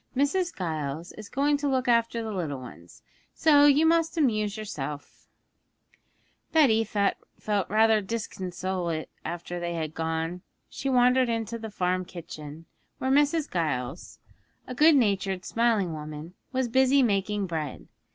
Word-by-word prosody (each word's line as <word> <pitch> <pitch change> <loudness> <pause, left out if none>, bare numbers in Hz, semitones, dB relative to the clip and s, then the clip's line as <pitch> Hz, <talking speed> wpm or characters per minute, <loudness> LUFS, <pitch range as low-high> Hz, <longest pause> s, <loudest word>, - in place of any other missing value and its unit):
Mrs. 340 +6 +1
Giles 160 -2 -4
is 215 -1 -11
going 285 +2 +1
to 290 0 -2
look 260 -2 0
after 230 -1 +2
the 220 - -4
little 155 -8 -3
ones, 105 -3 -13 0.3
so 290 -2 +5
you 290 +2 +5
must 330 +1 +2
amuse 215 -8 +1
yourself.' 150 -9 -7 1.2
Betty 260 -9 +4
felt 205 -1 -2
rather 220 +1 +4
disconsolate 185 -5 -4
after 175 +1 -5
they 170 0 -3
had 160 -2 -3
gone. 165 +2 -3 0.3
She 275 - -4
wandered 250 0 +4
into 230 0 -2
the 220 0 -6
farm 185 -2 -1
kitchen, 160 -3 -9 0.3
where 260 - -1
Mrs. 295 +2 +2
Giles, 150 -4 -3 0.5
a - - -6
good 305 +5 +6
natured, 195 -6 +1
smiling 225 -7 +1
woman, 155 +2 -7 0.2
was 260 -1 0
busy 265 +3 +4
making 205 -2 0
bread. 160 -4 -5
205 Hz, 135 wpm, -27 LUFS, 170-255 Hz, 1.2 s, good